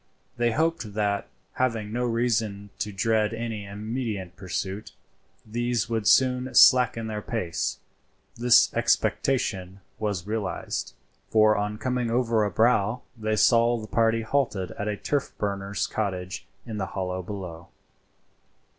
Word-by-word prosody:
They 120 0 +2
hoped 130 -6 -1
that, 100 -2 0 0.3
having 115 -4 -1
no 125 +1 0
reason 110 -4 -1
to 105 - -2
dread 110 +2 +1
any 110 -3 -4
immediate 105 -2 -4
pursuit, 95 +2 -4 0.5
these 120 0 -1
would 110 -2 0
soon 130 0 +3
slacken 120 -3 +6
their 105 -1 -4
pace. 95 -8 -2 0.6
This 120 0 +5
expectation 95 -8 0 0.2
was 100 -5 -2
realized, 105 -1 -3 0.3
for 110 -1 +5
on 105 +1 -2
coming 125 0 -1
over 115 -2 +2
a 105 - +1
brow 115 +2 +2
they 110 -1 -1
saw 115 +2 +4
the 110 - -6
party 115 +1 +2
halted 110 -7 0
at 105 - -5
a 105 -1 -1
turf 145 +5 -2
burner's 100 -1 -2
cottage 95 -4 -3 0.2
in 110 -2 -5
the 95 - -2
hollow 95 -1 -2
below. 90 -3 -7
110 Hz, 130 wpm, -26 LUFS, 100-120 Hz, 0.6 s, slacken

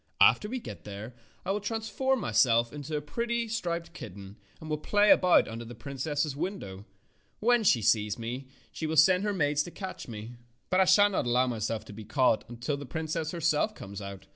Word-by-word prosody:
After 210 - +5
we 255 - -3
get 240 - -8
there 105 +4 -8 0.3
I 190 - 0
will 205 - 0
transform 225 +5 -1
myself 115 - +3
into 150 +1 -4
a - - -3
pretty, 235 +10 -2
striped 170 -6 -3
kitten, 100 - -9 0.2
and 160 - -9
will 155 -1 -2
play 205 +6 +4
about 180 -1 +5
under 115 +1 -6
the 120 +1 -9
princess's 140 +4 -3
window. 120 - -5 0.5
When 240 +1 +3
she 120 - +4
sees 105 -2 +2
me 120 +3 -5 0.2
she 160 - -4
will 160 0 -2
send 180 +5 +6
her 210 - 0
maids 150 -6 +1
to 160 - -5
catch 190 +1 -7
me. 115 +1 -8 0.3
But 185 - +3
I 190 - +6
shall 205 +2 +6
not 185 - -1
allow 125 +2 +3
myself 115 -2 -3
to - - -10
be 110 +1 -9
caught 125 +1 +2
until 120 +4 -3
the 140 -1 -8
princess 160 0 -3
herself 170 +4 +1
comes 100 +1 -8
out. 100 -1 -8
145 Hz, 200 wpm, -29 LUFS, 115-185 Hz, 0.5 s, send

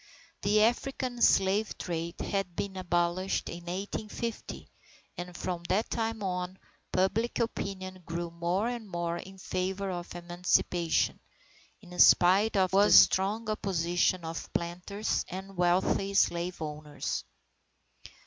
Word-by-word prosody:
The 210 +1 +4
African 245 +1 0
slave 195 +2 +3
trade 170 -1 -4
had 195 -3 -2
been 200 -1 -3
abolished 175 +1 0
in 170 0 -8
1850 205 +5 -5 0.5
and 175 0 -7
from 175 -2 -3
that 215 +5 +1
time 225 -2 -2
on 180 0 -3 0.3
public 205 +6 +1
opinion 190 -5 -3
grew 170 0 -4
more 170 +5 0
and 240 -4 -5
more 170 -1 -2
in 190 +2 -10
favour 190 +1 -2
of 175 -1 -6
Emancipation, 175 -1 +1 0.6
in 180 -3 -10
spite 195 +5 +6
of 185 -1 +3
the 200 +2 +5
strong 210 +4 +5
opposition 175 -4 0
of 165 0 -6
planters 180 +5 -2
and 190 +2 -7
wealthy 185 +2 +1
slave 175 -1 +2
owners. 150 -1 -4
185 Hz, 120 wpm, -30 LUFS, 175-200 Hz, 0.6 s, spite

